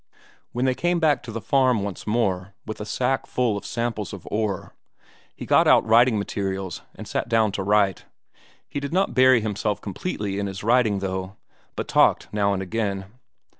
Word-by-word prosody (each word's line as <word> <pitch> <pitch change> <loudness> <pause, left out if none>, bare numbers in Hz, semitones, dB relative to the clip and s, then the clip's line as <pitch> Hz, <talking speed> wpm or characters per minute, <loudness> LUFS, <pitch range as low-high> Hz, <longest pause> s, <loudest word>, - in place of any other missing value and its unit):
When 125 +2 -1
they 130 - +3
came 175 +5 0
back 150 -5 +3
to 120 -2 -8
the 115 - -4
farm 130 -3 +2
once 100 0 -6
more 100 -4 -1
with 110 -1 -6
a - - -4
sack 130 +3 -1
full 120 -4 0
of 100 - -6
samples 115 -3 -3
of 100 - -9
ore 105 -3 -2 0.6
he - - -7
got - - +4
out - - +5
writing 115 +1 +5
materials 95 -2 -3
and - - -9
sat - - -2
down 110 -3 +3
to 100 - -3
write. 100 -1 +2 0.6
He - - -4
did 140 +2 -5
not 190 +2 +1
bury 130 -2 +5
himself 105 -1 -2
completely 100 - -4
in 100 - -2
his 95 0 -6
writing, 115 -3 +3
though, 95 0 -4 0.4
but - - -4
talked - - +3
now 100 -1 +2
and 95 -1 -1
again. 100 -1 -3
105 Hz, 185 wpm, -24 LUFS, 100-120 Hz, 0.6 s, out